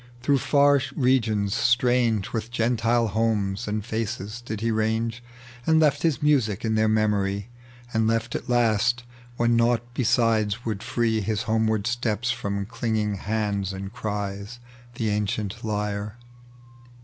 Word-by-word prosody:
Through 140 Hz, 0 st, +3 dB
far 140 Hz, +1 st, +4 dB
regions, 110 Hz, -7 st, +2 dB
atrange 120 Hz, -3 st, +2 dB
With 115 Hz, -1 st, -3 dB
Gentile 115 Hz, -1 st, +1 dB
homes 105 Hz, 0 st, 0 dB
and 105 Hz, 0 st, -2 dB
faces, 110 Hz, -1 st, -4 dB
did 110 Hz, -3 st, -5 dB
be 115 Hz, 0 st, +1 dB
range. 110 Hz, +2 st, -1 dB, 0.4 s
And 160 Hz, 0 st, +5 dB
left 150 Hz, -2 st, +3 dB
his 160 Hz, -3 st, 0 dB
muisic 120 Hz, -8 st, +2 dB
in 110 Hz, -, +1 dB
their 110 Hz, 0 st, +3 dB
memory, 105 Hz, -1 st, +1 dB, 0.4 s
And 110 Hz, -1 st, +2 dB
left 115 Hz, +1 st, 0 dB
at -, -, -5 dB
last, 120 Hz, +1 st, +2 dB, 0.3 s
when 120 Hz, 0 st, +3 dB
nought 115 Hz, 0 st, +2 dB
besides 115 Hz, -2 st, +1 dB
would 105 Hz, -3 st, -2 dB
free 115 Hz, -2 st, 0 dB
His 110 Hz, +1 st, -1 dB
homeward 110 Hz, -2 st, +1 dB
steps 120 Hz, 0 st, 0 dB
from 100 Hz, -4 st, -3 dB
elinging 110 Hz, -2 st, -1 dB
hands 100 Hz, -2 st, -1 dB
and 95 Hz, +2 st, -6 dB
cries, 105 Hz, 0 st, -4 dB, 0.4 s
The 115 Hz, -2 st, -1 dB
ancient 105 Hz, +1 st, -2 dB
lyre. 105 Hz, 0 st, -3 dB
110 Hz, 135 wpm, -25 LUFS, 105-120 Hz, 0.4 s, And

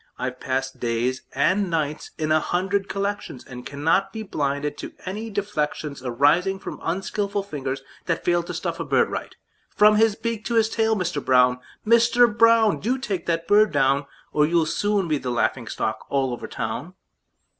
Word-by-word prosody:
I've 125 Hz, 0 st, -4 dB
passed 135 Hz, +1 st, -2 dB
days 120 Hz, +2 st, -1 dB
and 185 Hz, +8 st, +2 dB
nights 155 Hz, -2 st, -2 dB
in 155 Hz, -1 st, -1 dB
a 155 Hz, -, +5 dB
hundred 195 Hz, +4 st, -1 dB
collections, 200 Hz, -9 st, -3 dB
And 125 Hz, -1 st, -9 dB
cannot 165 Hz, +7 st, +1 dB
be 220 Hz, +2 st, -5 dB
blinded 145 Hz, -5 st, -2 dB
to -, -, -7 dB
any 210 Hz, +4 st, -4 dB
deflections 155 Hz, -8 st, -3 dB
Arising 145 Hz, +10 st, +2 dB
from 190 Hz, -, -8 dB
unskilful 200 Hz, +3 st, -2 dB
fingers 135 Hz, -7 st, -4 dB, 0.2 s
that 165 Hz, -2 st, -1 dB
fail 175 Hz, 0 st, +3 dB
To 170 Hz, -, -7 dB
stuff -, -, -3 dB
a -, -, -1 dB
bird -, -, +2 dB
right, -, -, -5 dB, 0.3 s
from 210 Hz, 0 st, +5 dB
his 220 Hz, -1 st, +4 dB
beak 230 Hz, -1 st, -3 dB
to 235 Hz, -, -1 dB
his 220 Hz, -1 st, +4 dB
tail. 225 Hz, 0 st, +1 dB
Mister 175 Hz, -7 st, -2 dB
Brown! 125 Hz, -1 st, +4 dB, 0.3 s
Mister 235 Hz, +2 st, +5 dB
Brown! 230 Hz, -1 st, +4 dB
Do 245 Hz, +6 st, 0 dB
take 210 Hz, -8 st, -4 dB
that 165 Hz, -1 st, -1 dB
bird 210 Hz, +1 st, +5 dB
down, 140 Hz, +1 st, +2 dB, 0.3 s
Or 150 Hz, 0 st, +4 dB
you'll 165 Hz, 0 st, +2 dB
soon 205 Hz, +3 st, 0 dB
be 155 Hz, -3 st, 0 dB
the 130 Hz, -, -4 dB
laughing 120 Hz, 0 st, 0 dB
stock 110 Hz, 0 st, -3 dB
all 135 Hz, -2 st, 0 dB
over 120 Hz, -, -6 dB
town!" -, -, -5 dB
170 Hz, 175 wpm, -24 LUFS, 140-205 Hz, 0.3 s, a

